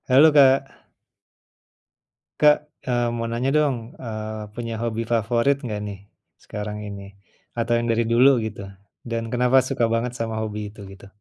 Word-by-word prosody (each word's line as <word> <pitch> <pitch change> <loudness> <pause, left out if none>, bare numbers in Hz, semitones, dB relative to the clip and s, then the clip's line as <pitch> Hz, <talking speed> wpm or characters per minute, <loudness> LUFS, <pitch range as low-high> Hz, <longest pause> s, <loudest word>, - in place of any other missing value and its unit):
Halo 140 +5 +7
Kak. 135 -1 +4 1.6
Kak, 150 0 +6 0.3
eee, 120 -1 +1
mau 115 0 -3
nanya 120 +3 0
dong. 150 -3 +2 0.2
Eee, 110 -2 -6
punya 115 0 -5
hobi 115 -1 -2
favorit 115 +5 +2
nggak 105 -3 -3
nih, 100 -1 -7 0.4
sekarang 105 0 -5
ini? 100 -1 -8 0.5
Atau 115 +1 0
yang 120 - -2
dari 115 +1 +2
dulu, 125 +3 +5
gitu. 100 -2 -6 0.4
Dan, 115 -1 -3
kenapa 125 +1 +3
suka 120 - 0
banget 120 +1 -1
sama 115 -2 -3
hobi 105 -1 -4
itu? 105 - -14
Gitu. 95 0 -13
115 Hz, 150 wpm, -23 LUFS, 110-125 Hz, 1.6 s, Halo